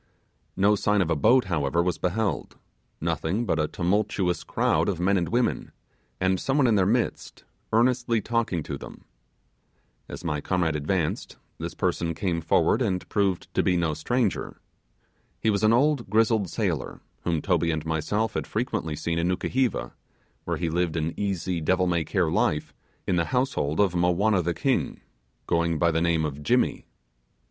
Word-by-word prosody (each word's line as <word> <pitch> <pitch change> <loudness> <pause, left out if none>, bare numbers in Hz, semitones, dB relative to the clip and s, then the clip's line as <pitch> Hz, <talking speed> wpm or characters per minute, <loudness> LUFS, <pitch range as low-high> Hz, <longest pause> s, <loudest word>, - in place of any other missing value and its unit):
No 100 +2 +4
sign 105 +1 +1
of 85 - -3
a - - +3
boat, 125 +3 +4
however, 85 -2 0
was 90 -2 -1
beheld, 100 +3 -2 0.4
nothing 100 +9 -1
but 80 - 0
a 75 - +1
tumultuous 90 -1 0
crowd - - +1
of 90 -4 -2
men 95 +3 +2
and 85 -4 0
women, 120 +5 0 0.5
and 95 0 +1
some 135 +1 0
one 145 - +4
in 120 - +4
their 95 -3 +3
midst, 120 +3 -1 0.3
earnestly 120 0 +2
talking 110 -7 -1
to - - -5
them. - - -11 1.0
As - - -8
my 75 -4 -2
comrade 85 -3 0
advanced, 75 +2 -2 0.2
this - - -5
person 85 -1 -1
came 85 -1 -1
forward 80 +8 +2
and 95 -6 -1
proved 100 -4 0
to - - +2
be 90 - +2
no 85 -2 0
stranger. 110 +8 -1 0.8
He 110 - +2
was 100 +1 -1
an 110 - +5
old 135 -1 +2
grizzled 110 -2 +2
sailor, - - -2 0.2
whom 85 -2 0
Toby 85 -1 +1
and 80 -1 -2
myself 100 +8 -1
had - - -3
frequently 110 - -2
seen 85 +2 -2
in 85 - +1
Nukuheva, 125 +7 0 0.5
where - - -1
he 85 -2 -2
lived 85 -1 0
an 80 0 -1
easy 95 -3 -2
devil 90 +4 +2
may 85 -2 +1
care - - 0
life 75 - 0 0.3
in 90 - +1
the 85 - +2
household 125 - -1
of 100 -3 +3
Mowanna 90 +3 +2
the 85 0 -1
king, 130 - -1 0.4
going 85 -1 +1
by 85 +1 +3
the 80 0 0
name 85 -2 +2
of 75 -1 -5
'Jimmy'. 75 - +1
90 Hz, 170 wpm, -26 LUFS, 85-110 Hz, 1.0 s, an